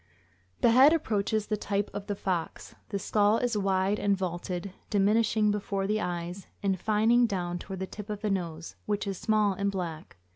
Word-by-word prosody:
The 235 Hz, -, +5 dB
head 265 Hz, +6 st, +7 dB
approaches 215 Hz, -7 st, 0 dB
the 215 Hz, -, -1 dB
type 200 Hz, 0 st, -2 dB
of 205 Hz, 0 st, -6 dB
the 205 Hz, -, -2 dB
fox. 180 Hz, -4 st, -3 dB, 0.2 s
The 200 Hz, -, -2 dB
skull 205 Hz, +2 st, +2 dB
is 245 Hz, -2 st, 0 dB
wide 195 Hz, 0 st, +1 dB
and 200 Hz, -1 st, +2 dB
vaulted, 180 Hz, +1 st, -4 dB, 0.2 s
diminishing 210 Hz, +1 st, +3 dB
before 200 Hz, -1 st, -2 dB
the 215 Hz, +2 st, 0 dB
eyes, 175 Hz, +1 st, -4 dB, 0.2 s
and 195 Hz, -2 st, +1 dB
fining 225 Hz, +4 st, +3 dB
down 175 Hz, -4 st, -2 dB
toward 190 Hz, +1 st, -7 dB
the -, -, -1 dB
tip 210 Hz, +2 st, -9 dB
of 210 Hz, -1 st, -4 dB
the 210 Hz, -, 0 dB
nose, 170 Hz, -3 st, -4 dB
which 205 Hz, 0 st, -1 dB
is 195 Hz, -2 st, -4 dB
small 215 Hz, -2 st, +2 dB
and 200 Hz, +1 st, -1 dB
black. 170 Hz, -, -5 dB
200 Hz, 185 wpm, -28 LUFS, 185-215 Hz, 0.2 s, head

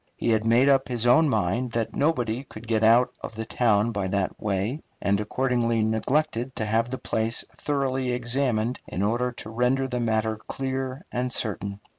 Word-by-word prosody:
He 120 Hz, -, 0 dB
had 110 Hz, 0 st, +1 dB
made 120 Hz, +4 st, +5 dB
up 135 Hz, -1 st, +4 dB
his 120 Hz, -2 st, -1 dB
own 145 Hz, +6 st, +5 dB
mind 110 Hz, +3 st, 0 dB
that 115 Hz, -1 st, -2 dB
nobody 130 Hz, -5 st, 0 dB
could 115 Hz, -3 st, -12 dB
get 110 Hz, -1 st, +1 dB
out 115 Hz, +3 st, +5 dB
of -, -, -7 dB
the 110 Hz, 0 st, -4 dB
town 110 Hz, -1 st, +2 dB
by 100 Hz, -3 st, -2 dB
that 95 Hz, 0 st, -1 dB
way, 105 Hz, +8 st, -1 dB, 0.2 s
and 100 Hz, 0 st, +1 dB
accordingly 115 Hz, 0 st, 0 dB
neglected 125 Hz, +3 st, 0 dB
to 110 Hz, -, -2 dB
have 115 Hz, +2 st, +1 dB
the 130 Hz, -, -3 dB
place 110 Hz, -1 st, 0 dB
thoroughly 135 Hz, -3 st, -1 dB
examined 120 Hz, -1 st, 0 dB
in 90 Hz, +5 st, -3 dB
order 120 Hz, +4 st, +1 dB
to 110 Hz, -2 st, -8 dB
render 125 Hz, +3 st, +1 dB
the 125 Hz, -1 st, -2 dB
matter 110 Hz, -1 st, 0 dB
clear 130 Hz, -, -4 dB
and 125 Hz, +1 st, -2 dB
certain. 100 Hz, -3 st, -3 dB
120 Hz, 180 wpm, -25 LUFS, 110-130 Hz, 0.2 s, made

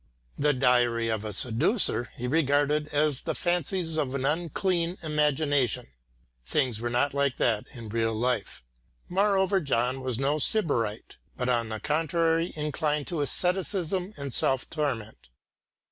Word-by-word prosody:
"The 150 Hz, +1 st, +2 dB
Diary 120 Hz, -3 st, +2 dB
of 110 Hz, -1 st, -1 dB
a 110 Hz, -, -4 dB
Seducer" 120 Hz, -, +2 dB
he 125 Hz, -, -3 dB
regarded 145 Hz, +1 st, +2 dB
as 150 Hz, -2 st, +1 dB
the -, -, -3 dB
fancies 175 Hz, -1 st, -1 dB
of 140 Hz, -3 st, -1 dB
an 135 Hz, -1 st, -1 dB
unclean 170 Hz, +3 st, 0 dB
imagination. 145 Hz, -, +1 dB, 0.5 s
Things 120 Hz, -, 0 dB
were 120 Hz, -, -1 dB
not 125 Hz, +4 st, +1 dB
like 140 Hz, -2 st, 0 dB
that 110 Hz, -3 st, +1 dB
in 115 Hz, -2 st, -8 dB
real 115 Hz, +1 st, -1 dB
life. 120 Hz, -, -2 dB, 0.5 s
Moreover 195 Hz, 0 st, +2 dB
John 130 Hz, -2 st, 0 dB
was 130 Hz, -3 st, -2 dB
no 140 Hz, +3 st, 0 dB
sybarite, 125 Hz, -, -1 dB, 0.2 s
but 125 Hz, 0 st, -1 dB
on 120 Hz, -2 st, +1 dB
the 110 Hz, -1 st, -4 dB
contrary 165 Hz, -, 0 dB
inclined 150 Hz, -1 st, -1 dB
to 170 Hz, -4 st, -2 dB
asceticism 180 Hz, +3 st, 0 dB
and 140 Hz, -3 st, -5 dB
self 135 Hz, -1 st, +1 dB
torment. 115 Hz, -, -3 dB
145 Hz, 140 wpm, -27 LUFS, 120-165 Hz, 0.5 s, The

